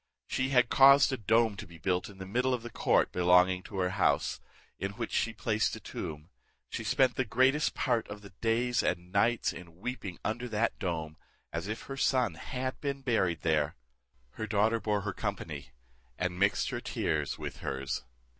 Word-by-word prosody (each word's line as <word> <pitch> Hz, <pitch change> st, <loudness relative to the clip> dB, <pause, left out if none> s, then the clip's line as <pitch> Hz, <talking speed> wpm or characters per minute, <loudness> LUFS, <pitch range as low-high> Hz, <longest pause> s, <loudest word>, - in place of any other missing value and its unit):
She 130 Hz, 0 st, -1 dB
had 125 Hz, -3 st, +4 dB
caused 140 Hz, 0 st, +7 dB
a -, -, +2 dB
dome 110 Hz, 0 st, +2 dB
to 100 Hz, -, -7 dB
be 85 Hz, -1 st, -13 dB
built 90 Hz, +4 st, -1 dB
in 100 Hz, -, -13 dB
the 95 Hz, -, -7 dB
middle 125 Hz, +6 st, +1 dB
of 120 Hz, -, -8 dB
the 120 Hz, -, -7 dB
court -, -, +2 dB
belonging 90 Hz, +1 st, +4 dB
to 100 Hz, -, -9 dB
her 90 Hz, -1 st, +1 dB
house, -, -, +1 dB, 0.4 s
in 95 Hz, +1 st, -3 dB
which 115 Hz, +1 st, -4 dB
she 115 Hz, -, +1 dB
placed 110 Hz, -1 st, 0 dB
a -, -, -8 dB
tomb. 75 Hz, +2 st, -7 dB, 0.4 s
She -, -, -4 dB
spent 130 Hz, -2 st, +2 dB
the 130 Hz, -, +2 dB
greatest 130 Hz, +6 st, +2 dB
part 120 Hz, -3 st, 0 dB
of 105 Hz, 0 st, -8 dB
the 100 Hz, -, -11 dB
days 115 Hz, +1 st, +2 dB
and 90 Hz, +1 st, -2 dB
nights 115 Hz, +4 st, +2 dB
in 85 Hz, -1 st, -11 dB
weeping 100 Hz, -4 st, -5 dB
under 120 Hz, +3 st, -2 dB
that 110 Hz, +1 st, 0 dB
dome, 80 Hz, -5 st, -3 dB, 0.4 s
as 85 Hz, +3 st, -3 dB
if 110 Hz, +1 st, -4 dB
her 135 Hz, -, -7 dB
son 125 Hz, -7 st, +2 dB
had 130 Hz, +10 st, -4 dB
been 140 Hz, -1 st, -2 dB
buried 95 Hz, -, +1 dB
there: 80 Hz, -1 st, +1 dB, 0.6 s
her 110 Hz, +8 st, -5 dB
daughter 110 Hz, +2 st, +2 dB
bore 105 Hz, -2 st, 0 dB
her 105 Hz, -1 st, -3 dB
company, 80 Hz, -, -4 dB, 0.5 s
and 90 Hz, 0 st, -2 dB
mixed 100 Hz, +1 st, +2 dB
her -, -, -3 dB
tears -, -, -1 dB
with -, -, -6 dB
hers. 65 Hz, -1 st, -3 dB
105 Hz, 190 wpm, -30 LUFS, 90-120 Hz, 0.6 s, caused